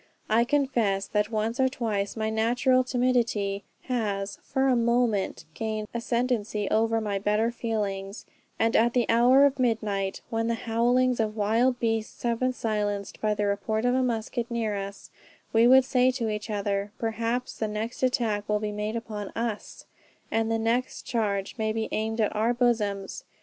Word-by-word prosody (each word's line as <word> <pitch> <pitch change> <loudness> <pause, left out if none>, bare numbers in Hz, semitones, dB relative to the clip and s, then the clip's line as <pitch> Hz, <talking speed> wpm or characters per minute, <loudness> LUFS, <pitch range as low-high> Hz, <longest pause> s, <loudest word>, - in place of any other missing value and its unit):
I 230 +2 +4
confess 240 -8 +1
that 210 0 0
once 225 +2 -2
or 260 0 +4
twice 215 -5 -2
my 220 0 -1
natural 245 +4 +2
timidity 240 -6 0 0.2
has 205 -5 -2
for 265 0 0
a 260 - +4
moment 235 -4 +1
gained 215 +2 -3
ascendancy 235 -3 -1
over 225 +1 +2
my 205 -2 -2
better 210 +3 +1
feelings, 205 -4 -3 0.3
and 225 0 +1
at 235 +1 +4
the 245 -2 +2
hour 250 +4 +6
of 280 -1 +1
midnight, 210 -5 0
when 225 0 0
the 230 - +1
howlings 240 +2 +1
of 215 -1 0
wild 230 +4 +2
beasts 225 -1 -2
have 235 -1 0
been 255 0 +2
silenced 205 -4 -2
by 215 -1 +1
the 205 0 0
report 215 +3 -1
of 245 - +3
a 260 - +2
musket 235 0 -2
near 225 -3 -1
us, 200 0 -7 0.4
we 225 +1 +6
would 260 +1 +7
say 255 -1 +3
to 245 -3 -1
each 210 +1 -4
other, 200 -1 -1
perhaps 230 +2 -2
the 220 - 0
next 215 +3 -4
attack 225 -5 0
will 210 0 +2
be 210 0 -3
made 210 +2 -3
upon 215 -3 -5
us, 230 -2 -4 0.5
and 225 0 +1
the 225 - +2
next 230 +3 -1
charge 205 -5 -1
may 220 0 +1
be 220 0 -2
aimed 220 +1 -2
at 215 - +1
our 225 +3 +1
bosoms. 210 -5 0
225 Hz, 170 wpm, -27 LUFS, 210-240 Hz, 0.5 s, would